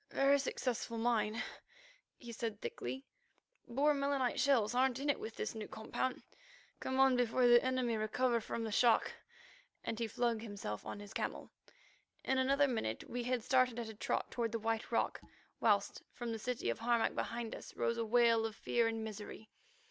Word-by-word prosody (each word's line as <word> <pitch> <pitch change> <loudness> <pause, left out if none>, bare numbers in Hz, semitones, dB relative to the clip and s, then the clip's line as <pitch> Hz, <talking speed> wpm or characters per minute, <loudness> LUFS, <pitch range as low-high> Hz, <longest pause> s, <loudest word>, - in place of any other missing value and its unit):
"Very 280 +1 +4
successful 250 -3 -2
mine," 225 -1 +1 0.7
he 240 - -9
said 230 -2 -4
thickly. 445 - -5 0.6
"Boer 280 +5 +3
melinite 280 -3 0
shells 245 -6 +3
aren't 255 0 +3
in 285 +2 +1
it - - -4
with 220 0 -6
this - - -3
new 220 -2 -6
compound. 250 +3 -3 0.6
Come 260 0 -2
on 265 -1 +6
before 245 +1 +2
the 240 0 +7
enemy 255 -2 +1
recover 235 +2 +1
from 230 +1 -4
the 220 - -3
shock," 230 +2 +4 0.7
and 225 - -3
he 230 - 0
flung 235 +1 0
himself 205 - -5
upon 205 - -7
his 205 - -10
camel. - - -3 0.7
In 265 0 +1
another 275 +2 +4
minute 220 - -2
we 245 0 -2
had 250 -2 0
started 255 -1 +3
at 235 -2 -4
a - - -7
trot 210 - -2
toward 230 -2 -1
the - - +1
White 225 0 -2
Rock, - - 0 0.4
whilst 205 -3 +2
from 240 -1 -5
the 225 - -3
city 240 - -1
of - - -5
Harmac 235 -1 +2
behind 230 -1 -3
us - - -9
rose 235 0 0
a - - +1
wail 230 0 +4
of 220 - -9
fear 235 0 +1
and 225 -1 -2
misery. 215 0 -8
235 Hz, 180 wpm, -35 LUFS, 220-255 Hz, 0.7 s, the